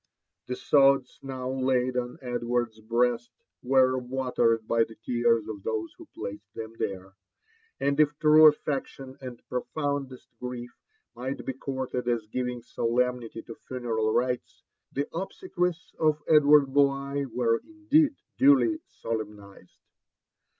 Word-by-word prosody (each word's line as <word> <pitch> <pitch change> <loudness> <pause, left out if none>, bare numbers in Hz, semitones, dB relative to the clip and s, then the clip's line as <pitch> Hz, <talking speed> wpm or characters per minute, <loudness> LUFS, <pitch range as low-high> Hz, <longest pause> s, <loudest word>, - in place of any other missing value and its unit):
The 125 - -2
sods 135 -1 +3
now 130 -1 -4
laid 130 -1 +1
on 125 -1 -2
Edward's 120 -2 -2
breast 120 +2 0 0.3
were 130 0 +3
watered 125 -3 0
by 115 0 +3
the 115 0 -9
tears 115 -1 +1
of 105 -2 -6
those 110 +1 -3
who - - -14
placed 105 +1 -8
them 110 0 -6
there; 95 0 -4 0.7
and 140 +1 0
if 150 -1 +3
true 155 +1 +7
affection 135 -3 -1
and 125 -2 -9
profoundest 135 -1 -3
grief 125 -1 -6 0.4
might 130 +2 -5
be 135 - -2
courted 130 -2 -4
as 120 -3 0
giving 125 +1 -3
solemnity 120 -1 -1
to 115 - -9
funeral 115 -4 -1
rights, 125 +2 -1 0.3
the 140 +2 -2
obse 190 - -5
quies 175 -2 -1
of 155 -1 +2
Edward 145 -3 +6
Bligh 140 0 +2
were 115 -1 +1
indeed, 315 -2 +2 0.2
duly 285 +4 +5
solemnised. 105 -4 -7
125 Hz, 130 wpm, -27 LUFS, 115-140 Hz, 0.7 s, true